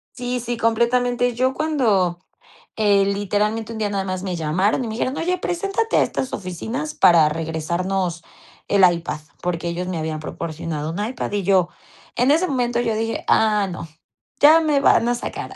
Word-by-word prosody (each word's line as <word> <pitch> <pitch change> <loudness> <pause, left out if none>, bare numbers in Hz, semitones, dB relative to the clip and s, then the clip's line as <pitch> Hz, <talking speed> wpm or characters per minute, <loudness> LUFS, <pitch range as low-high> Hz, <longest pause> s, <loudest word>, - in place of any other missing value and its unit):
Sí 245 0 -3
sí, 240 0 -4
completamente. 245 +2 +1
Yo 260 +2 +1
cuando, 225 - +1 0.6
eh, 205 -2 +3
literalmente, 210 +3 -1
un 220 - -6
día 210 -1 0
nada 200 -1 -1
más 185 -1 -4
me 185 -2 -3
llamaron 175 - 0
y - - -4
me 220 - -4
dijeron: 255 +4 -2
"Oye, 360 +2 0
preséntate 395 +6 -1
a - - +5
estas 265 - -3
oficinas 225 - -4
para 165 -3 +5
regresarnos 170 +3 -2 0.4
el 200 -1 +3
iPad", 170 -3 -3 0.2
porque 175 -1 -2
ellos 175 +1 -3
me 180 -2 -3
habían 155 -1 -3
proporcionado 155 -1 -5
un 200 +5 -3
iPad, 240 0 -4
y 205 -1 -1
yo, 185 -2 +3 0.5
en 250 +3 +3
ese 330 +5 +3
momento 245 -5 0
yo 230 -2 0
dije: 225 +1 -2
"Ah, 210 -2 +3
no, 170 -2 -7 0.5
ya 315 +3 +7
me 300 -3 +2
van 255 -4 +4
a 245 - +1
sacar". 240 - -6
210 Hz, 175 wpm, -21 LUFS, 175-245 Hz, 0.6 s, ya